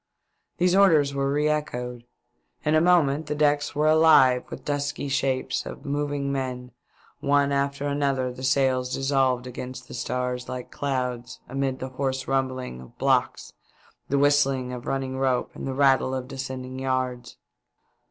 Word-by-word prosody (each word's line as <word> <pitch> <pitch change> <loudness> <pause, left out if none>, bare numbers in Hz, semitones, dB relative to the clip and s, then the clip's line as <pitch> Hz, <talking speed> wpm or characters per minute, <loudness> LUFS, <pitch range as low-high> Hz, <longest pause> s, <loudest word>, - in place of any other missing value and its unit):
These 180 +1 +3
orders 160 -8 +5
were 140 0 0
re 150 +1 +1
echoed. 125 -5 -3 0.6
In 150 - +2
a 155 - +5
moment 160 -4 +3
the 150 - -2
decks 145 -1 +1
were 150 +1 +1
alive 155 -5 +6
with - - -9
dusky 145 0 -2
shapes 135 -1 0
of 135 - -9
moving 145 -1 -2
men; 130 -2 -4 0.5
one 140 -1 +2
after 140 0 -1
another 140 -3 0
the 125 - -10
sails 130 -1 +1
dissolved 135 -2 +1
against 125 0 -7
the - - -10
stars 125 0 -3
like 125 -1 -6
clouds, 125 -3 -3
amid 135 0 -2
the 130 - -5
hoarse 130 0 -3
rumbling 130 - -2
of 65 - -15
blocks, - - 0 0.6
the 140 - +1
whistling 135 -3 +2
of 125 -1 -7
running 130 -1 -2
ropes, 130 -2 0
the 135 - -4
rattle 135 -1 +3
of 130 -1 -4
descending 130 -1 -6
yards. 130 -2 -2
135 Hz, 150 wpm, -25 LUFS, 130-145 Hz, 0.6 s, alive